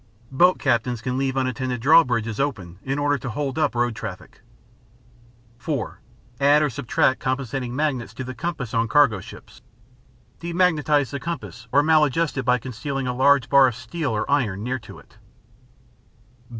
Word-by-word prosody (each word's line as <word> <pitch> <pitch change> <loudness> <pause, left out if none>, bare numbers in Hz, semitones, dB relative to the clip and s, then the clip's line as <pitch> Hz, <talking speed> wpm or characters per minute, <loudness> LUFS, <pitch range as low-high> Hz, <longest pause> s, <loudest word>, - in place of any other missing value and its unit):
Boat 180 +7 +4
captains 120 -2 0
can 125 +2 -3
leave 135 0 -1
unattended 130 -1 -2
draw 160 +7 +6
bridges 115 -4 -2
open 95 -11 -3
in 135 +1 -3
order 145 -1 +1
to 130 - -5
hold 140 +4 -3
up 150 -5 +1
road 120 -1 0
traffic. 95 -4 -8 1.2
(4) 130 -1 -4 0.4
Add 145 +2 +4
or 150 - 0
subtract 130 +1 +1
compensating 130 -1 -3
magnets 140 -5 -1
to 130 - -5
the 130 0 -6
compass 135 -4 -5
on 115 0 +1
cargo 140 -8 +4
ships. 95 - -13 0.8
Demagnetize 160 -5 +1
the 140 - -4
compass 135 -6 -6
or 145 +2 +4
maladjust 155 0 +2
it 135 - -1
by 125 0 +3
concealing 130 +2 -5
a 125 - -1
large 135 0 +3
bar 140 -1 +6
of 125 - -2
steel 155 +4 -4
or 105 -2 -1
iron 105 -9 0
near 130 +2 -2
to 110 - -13
it. 105 - -19
130 Hz, 165 wpm, -23 LUFS, 120-145 Hz, 1.2 s, draw